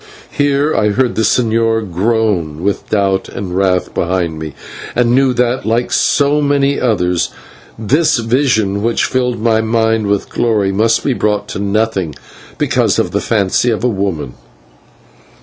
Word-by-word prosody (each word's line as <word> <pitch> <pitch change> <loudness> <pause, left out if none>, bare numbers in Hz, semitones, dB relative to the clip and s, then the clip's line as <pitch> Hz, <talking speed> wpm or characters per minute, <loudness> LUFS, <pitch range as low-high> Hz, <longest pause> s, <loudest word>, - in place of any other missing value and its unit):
Here 145 +1 +1
I 105 - +2
heard 120 +3 +1
the - - -1
señor 110 -3 +1
groan 95 -6 0
with 100 0 -2
doubt 95 -2 0
and 95 -2 -6
wrath 95 -1 0
behind 85 -2 -1
me, 80 -2 -7 0.4
and 120 0 +2
knew 135 0 +3
that, 125 +1 0
like 115 +2 0
so 145 +1 +2
many 140 -1 +1
others, 90 -8 0 0.5
this 140 +10 +2
vision 115 -4 +1
which 115 +2 +1
filled 125 -2 -1
my 110 0 +2
mind 110 -1 +1
with 100 -1 0
glory 105 -5 0
must 110 +4 +1
be 135 - +1
brought 105 -3 -1
to - - -5
nothing 100 -5 -1 0.4
because - - +1
of - - 0
the - - -1
fancy 105 +2 +1
of 110 -1 -1
a - - +3
woman. 95 - -3
110 Hz, 150 wpm, -15 LUFS, 95-120 Hz, 0.5 s, knew